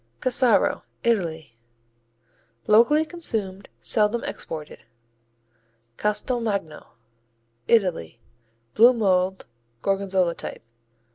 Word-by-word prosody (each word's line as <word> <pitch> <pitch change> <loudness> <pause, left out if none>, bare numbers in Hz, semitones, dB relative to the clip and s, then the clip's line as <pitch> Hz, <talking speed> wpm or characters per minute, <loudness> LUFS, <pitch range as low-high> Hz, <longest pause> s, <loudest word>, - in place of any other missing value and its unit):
Cassaro 255 -1 +2 0.2
Italy 160 - -1 1.1
Locally 235 +9 +4
consumed, 215 - -4
seldom 215 +1 +1
exported. 155 -2 -6 1.2
Castelmagno 210 -5 -2 0.8
Italy 180 - +1 0.5
Blue 240 +3 +6
mold, 190 -4 0 0.4
Gorgonzola 195 -3 0
type. - - -8
200 Hz, 65 wpm, -24 LUFS, 180-235 Hz, 1.2 s, Blue